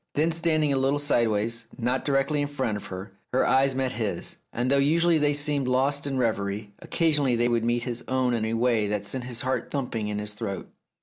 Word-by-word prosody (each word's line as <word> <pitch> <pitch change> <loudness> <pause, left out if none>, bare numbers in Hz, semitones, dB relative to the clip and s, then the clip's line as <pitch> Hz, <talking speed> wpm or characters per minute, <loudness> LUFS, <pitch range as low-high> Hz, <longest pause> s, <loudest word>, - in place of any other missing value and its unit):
Then, 160 +3 +2
standing 155 -3 +2
a 135 - +1
little 135 +2 +2
sideways, 115 -5 +1
not 125 +2 0
directly 140 +1 +1
in 145 - 0
front 130 -7 -2
of 105 - -6
her, 95 +1 -7 0.2
her 130 - +3
eyes 135 0 +3
met 130 -1 0
his, 105 -7 -3
and 125 +3 -1
though 140 - +4
usually 165 +3 +3
they 145 -1 +2
seemed 145 -2 0
lost 140 +3 +1
in 135 -1 -2
reverie, 105 -3 -1
occasionally 145 -6 +1
they 120 +1 +2
would 120 -1 +1
meet 120 0 +1
his 120 -1 -4
own 130 -1 +1
in 115 -2 0
a 110 +1 -1
way 115 -3 +2
that 105 0 -2
sent 125 +5 -2
his 125 -2 -2
heart 130 +1 -2
thumping 120 -6 -2
in 105 0 -3
his 105 0 -4
throat. 105 -2 -5
125 Hz, 220 wpm, -26 LUFS, 115-140 Hz, 0.2 s, though